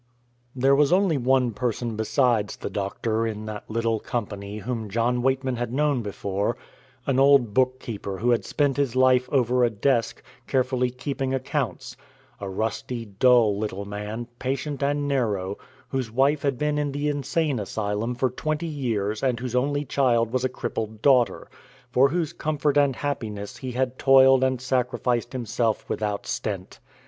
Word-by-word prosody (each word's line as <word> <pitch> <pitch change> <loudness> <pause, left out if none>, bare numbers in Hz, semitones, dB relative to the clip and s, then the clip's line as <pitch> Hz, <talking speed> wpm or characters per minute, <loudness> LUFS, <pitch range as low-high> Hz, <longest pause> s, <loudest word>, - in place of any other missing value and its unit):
There 135 +2 +3
was 140 0 +4
only 180 -5 +3
one 130 -1 +2
person 120 0 -2
besides 110 0 +1
the - - -6
doctor 110 +3 -1
in 110 -1 -5
that 105 -1 -7
little 115 0 0
company 105 -4 -4
whom 110 0 -4
John 120 +4 +1
Weightman 130 0 0
had 120 -1 -3
known 145 -1 +1
before 100 +1 -2 0.5
an 135 -2 +1
old 135 -5 +5
bookkeeper 120 -6 -1
who 120 +5 +1
had 120 - +2
spent 145 -2 0
his 135 -4 0
life 130 -1 +4
over 125 -2 +2
a 120 - +4
desk, 115 +2 0 0.2
carefully 130 -1 +1
keeping 135 +1 -3
accounts 130 -1 -3 0.4
a 100 - -5
rusty, 115 +4 -3
dull 110 +1 +4
little 100 -2 -3
man, 105 +3 -5
patient 135 +2 -3
and 145 +1 0
narrow, 105 -8 -1 0.3
whose 130 -4 -2
wife 135 +5 +2
had 140 -3 0
been 150 +1 0
in 145 -1 -1
the 145 +1 -1
insane 145 -1 0
asylum 105 +3 -2
for 130 0 0
twenty 155 +5 -2
years 115 -9 -2
and 125 -3 +1
whose 125 -1 -4
only 145 +3 +1
child 120 -4 +2
was 130 -1 0
a 130 - +1
crippled 110 -3 -5
daughter, 125 -8 +3 0.4
for 130 +2 +5
whose 165 0 -1
comfort 150 -3 0
and 140 -3 +3
happiness 110 -7 -4
he 130 -2 -6
had 130 0 -1
toiled 135 -1 +6
and 130 -1 +1
sacrificed 125 -1 0
himself 115 -3 -1
without 105 -2 -2
stint. 95 -4 -4
125 Hz, 160 wpm, -25 LUFS, 110-135 Hz, 0.5 s, toiled